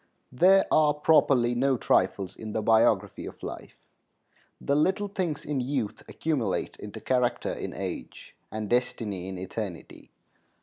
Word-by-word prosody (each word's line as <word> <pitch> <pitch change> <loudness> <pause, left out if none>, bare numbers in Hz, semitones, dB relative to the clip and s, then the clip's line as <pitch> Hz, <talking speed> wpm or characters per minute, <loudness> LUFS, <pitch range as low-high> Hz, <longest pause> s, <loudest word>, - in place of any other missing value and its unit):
There 185 +9 +5
are 150 -1 +4
properly 140 -5 +4
no 130 +2 +2
trifles 95 -2 +1
in 110 -1 -7
the 110 - -1
biography 110 +1 +2
of - - -11
life. - - -7 0.8
The 140 - 0
little 190 +7 +2
things 180 -7 -3
in 145 -3 -1
youth 125 -4 -2
accumulate 135 -11 -1
into 105 -1 -8
character 125 -2 0
in - - -6
age - - -6 0.2
and 110 -1 -4
destiny 105 -5 -1
in 95 - -6
eternity. 95 -1 -7
125 Hz, 135 wpm, -27 LUFS, 105-150 Hz, 0.8 s, There